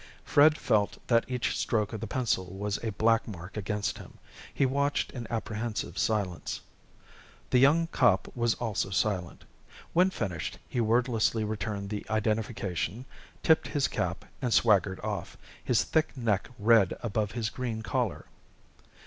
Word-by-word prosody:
Fred 155 +2 +5
felt 105 -2 +1
that 115 -1 +4
each 125 -2 -1
stroke 105 -1 0
of 110 - -5
the 115 - -3
pencil 115 -7 0
was 105 +1 -3
a 115 - 0
black 115 +3 +2
mark 95 -2 -8
against 105 0 -2
him. - - -12 0.3
He 140 - +2
watched 140 +2 0
in 120 -3 -6
apprehensive 110 -1 -3
silence. 100 -6 -1 0.9
The 125 - +5
young 150 +6 +5
cop 125 - +3
was 120 -2 +1
also 110 -4 -2
silent. 95 -3 -1 0.5
When 180 +3 +5
finished 90 - -4
he 120 - -1
wordlessly 115 -1 +2
returned 105 -1 -3
the 105 - -3
identification, 110 -1 -1 0.4
tipped 160 0 +4
his 145 -2 +1
cap, - - -3 0.2
and 125 -3 -1
swaggered 100 -5 +3
off, - - -4 0.3
his - - +2
thick 160 -3 0
neck 110 -5 0
red 105 -2 +4
above 110 -2 -1
his 115 -2 -2
green 115 -4 -4
collar. 120 -3 -1
110 Hz, 145 wpm, -29 LUFS, 105-125 Hz, 0.9 s, Fred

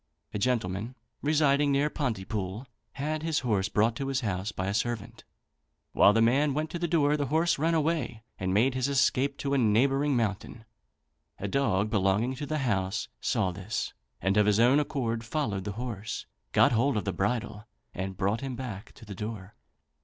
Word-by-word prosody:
A 105 - -2
gentleman, 110 0 -1 0.3
residing 145 -1 +3
near 140 +2 +3
Pontypool, 110 -5 -3 0.3
had 150 +2 -2
his 160 -1 0
horse 105 -6 0
brought 110 +2 +2
to 135 - -3
his 135 -1 0
house 100 -2 -2
by 95 - -4
a 100 - -1
servant. 110 -1 -3 0.7
While 100 - +6
the 115 +2 +3
man 135 +4 +3
went 155 +1 -2
to 170 - -4
the 170 - 0
door, 150 -3 +3
the 145 -1 -1
horse 160 +3 +2
ran 165 +2 +2
away 155 -8 -1 0.2
and 95 0 -1
made 115 +7 +3
his 130 0 0
escape 140 0 +2
to 140 0 -2
a 140 - +3
neighbouring 135 +5 +3
mountain. 110 +1 -3 0.7
A 100 - -4
dog 105 -4 +1
belonging 105 +4 +2
to 145 - -5
the 155 - -1
house 95 -5 -1
saw 95 - 0
this, 100 +4 -4 0.3
and 95 +3 +1
of 105 0 +4
his 105 0 +3
own 125 +5 +5
accord 120 -6 -2
followed 115 -7 -2
the 105 - -3
horse, 110 -2 -5 0.3
got - - +5
hold 120 +1 +2
of 105 - -2
the 95 - -1
bridle 105 +2 -2 0.3
and 95 0 -4
brought 100 +5 0
him 135 -2 -4
back 115 -6 -7
to 115 - -14
the 100 - -7
door. 105 -1 -6
115 Hz, 185 wpm, -28 LUFS, 100-140 Hz, 0.7 s, While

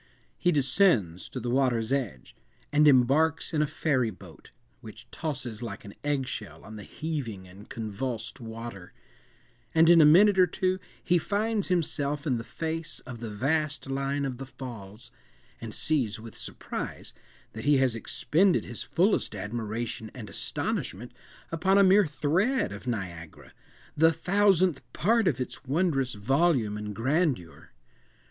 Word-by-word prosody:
He 180 - +3
descends 130 - +2
to 130 - -5
the 120 0 -3
water's 125 -3 +1
edge, 115 - -3 0.4
and 150 +1 +5
embarks 145 +5 +3
in 155 - +2
a 150 - +2
ferry 140 -5 0
boat, 90 -5 -13 0.3
which 115 0 -12
tosses 125 -8 -4
like 110 -3 -6
an 100 - -9
egg 145 -3 0
shell 110 -5 -6
on 110 +2 -10
the 105 - -8
heaving 120 - -5
and 95 +4 -14
convulsed 115 +3 -4
water; 115 -5 -8 0.8
and 165 +1 +7
in 170 -1 +8
a - - +8
minute 190 +6 +6
or 180 - +7
two 185 +2 0 0.2
he 175 0 +3
finds 210 +3 -1
himself 150 -4 -1
in 130 -6 +1
the - - -5
face 165 +4 -4
of 125 -2 -9
the 115 -1 -5
vast 145 +5 -1
line 140 +1 -1
of 130 -2 -4
the 135 - -6
Falls, 120 -3 -10 0.5
and 115 -2 -6
sees 125 -6 0
with 115 0 -11
surprise - - -6 0.4
that 110 - -7
he 145 -1 +5
has 130 -3 +2
expended 170 - +1
his - - -4
fullest 180 - +1
admiration 110 +2 -4
and 115 -5 -8
astonishment 110 +8 -3 0.4
upon 190 +4 +2
a 200 - +7
mere 195 0 +5
thread 170 - +1
of 100 +5 -9
Niagara—the 95 - -2
thousandth 185 -3 +2
part 225 +1 +2
of 140 -8 +1
its 125 - -4
wondrous 135 -3 +1
volume 130 0 +2
and 105 -1 -5
grandeur. 130 - -1
135 Hz, 150 wpm, -28 LUFS, 110-160 Hz, 0.8 s, in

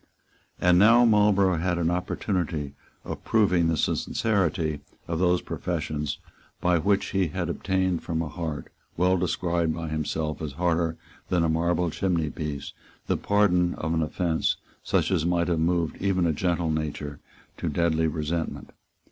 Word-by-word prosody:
And 90 0 +5
now 115 +4 +7
Marlborough 105 -4 +4
had 90 +1 0
an 85 0 +1
opportunity 85 -5 -2 0.3
of - - -6
proving 90 -6 +3
the 80 -1 +1
sincerity 85 -6 0 0.3
of 85 -1 -2
those 90 -1 +2
professions 75 -1 -3 0.4
by 90 -1 +2
which 100 +3 +1
he 95 -2 +1
had 75 - -3
obtained 95 -2 0
from 80 -2 -3
a - - -4
heart, 75 -1 -5 0.2
well 90 +2 +3
described 85 -2 0
by 80 -1 -4
himself 75 0 -2
as 75 -3 -4
harder 85 0 0 0.3
than 90 -2 +2
a 80 - +2
marble 85 +1 +1
chimneypiece, 80 -5 -2 0.3
the - - +1
pardon 90 -4 +2
of 80 +1 -2
an 80 - +1
offence 80 +1 0 0.2
such - - +1
as 85 -5 +2
might 85 0 +1
have 85 -2 +1
moved 85 0 0
even 95 -2 +2
a 80 - +2
gentle 85 0 0
nature 75 -2 -3 0.4
to - - -2
deadly 80 -1 +1
resentment. 80 +1 -3
85 Hz, 150 wpm, -26 LUFS, 80-90 Hz, 0.4 s, now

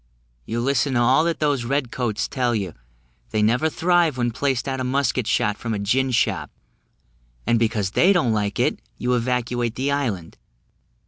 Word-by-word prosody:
You 115 +1 -2
listen 135 +1 +1
to - - +3
all 130 +6 +4
that 170 -1 -1
those 145 -5 +1
red 130 0 -1
coats 120 -4 -2
tell 125 -3 0
you; 95 -6 -3 0.6
they 105 -1 0
never 125 +9 +2
thrive 170 -3 +2
when 120 -1 0
placed 135 +1 -1
out 135 -1 -2
of 130 - -2
musket 130 -3 0
shot 105 -2 +1
from 115 -2 -3
a - - -2
gin 125 +7 +1
shop: 120 - 0 1.0
and 120 -1 +2
because 110 -4 0
they 185 - +4
don't 160 - +2
like 105 -1 -1
it, - - +1 0.2
you 125 +1 0
evacuate 120 -1 -1
the 135 +2 -1
island. 110 -13 -3
125 Hz, 180 wpm, -22 LUFS, 115-140 Hz, 1.0 s, all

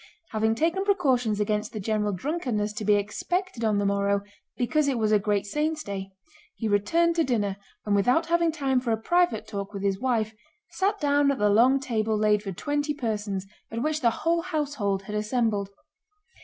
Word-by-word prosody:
Having 220 0 +1
taken 335 +8 +1
precautions 260 - +1
against 210 +1 -1
the 215 - -4
general 210 0 0
drunkenness 215 - -2
to 215 - -5
be 210 0 +4
expected 240 - -2
on 215 -2 +2
the 205 - +1
morrow 200 0 +1 0.3
because 295 +4 +1
it 270 -3 +1
was 215 -1 +1
a 210 - +5
great 205 0 0
saint's 305 +7 -1
day, 195 -1 -5 0.5
he 225 - -3
returned 330 +12 +2
to 330 - +4
dinner, 205 -8 0 0.3
and 210 - 0
without 250 +11 +3
having 335 0 +2
time 275 -4 +1
for 250 -1 -4
a 225 - +2
private 345 -1 +1
talk 200 0 -5
with 195 - -5
his 195 -1 0
wife 225 -4 0 0.4
sat 390 +2 0
down 285 -1 +3
at 280 - +1
the 210 0 +2
long 250 +6 +5
table 220 -4 -1
laid 210 -1 +3
for 200 -2 -5
twenty 290 - -2
persons, 210 -7 -3 0.2
at 230 +2 -3
which 310 0 -1
the 235 - +4 0.2
whole 335 0 +3
household 285 - -2
had 210 - -7
assembled. 210 -2 0
225 Hz, 190 wpm, -26 LUFS, 205-290 Hz, 0.5 s, a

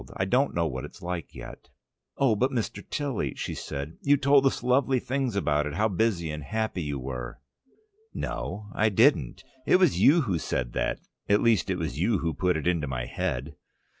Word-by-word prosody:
I 95 - 0
don't 130 +8 +1
know 85 -1 +1
what 65 -4 -3
it's - - -11
like 90 -1 -5
yet." - - -10 0.5
"Oh, 130 -5 +3
but, 125 +5 +2
Mr. 120 -5 -3
Tilly," 140 -7 -2
said 70 +4 -5
she. - - -5
"You 145 - +7
told 140 0 +4
us 130 - -1
lovely 130 +1 +3
things 130 -2 -2
about 75 -6 +1
it, 75 - -5
how 110 +5 +2
busy 95 -5 0
and 75 0 -5
happy 110 +3 -2
you 75 -3 -3
were." 65 -1 -6 0.7
"No, 105 0 -5
I 110 +1 +2
didn't. 110 - +3 0.2
It - - +5
was 175 - +3
you 155 +9 +6
who 95 - -1
said 60 -5 -2
that, - - -1 0.3
at 100 +1 +4
least 110 -7 +3
it 95 - 0
was 75 -5 -4
you 100 +4 +2
who 80 -2 -2
put 90 +3 +1
it 80 - -5
into 85 -4 +1
my - - -3
head." - - -3
95 Hz, 195 wpm, -27 LUFS, 75-125 Hz, 0.7 s, You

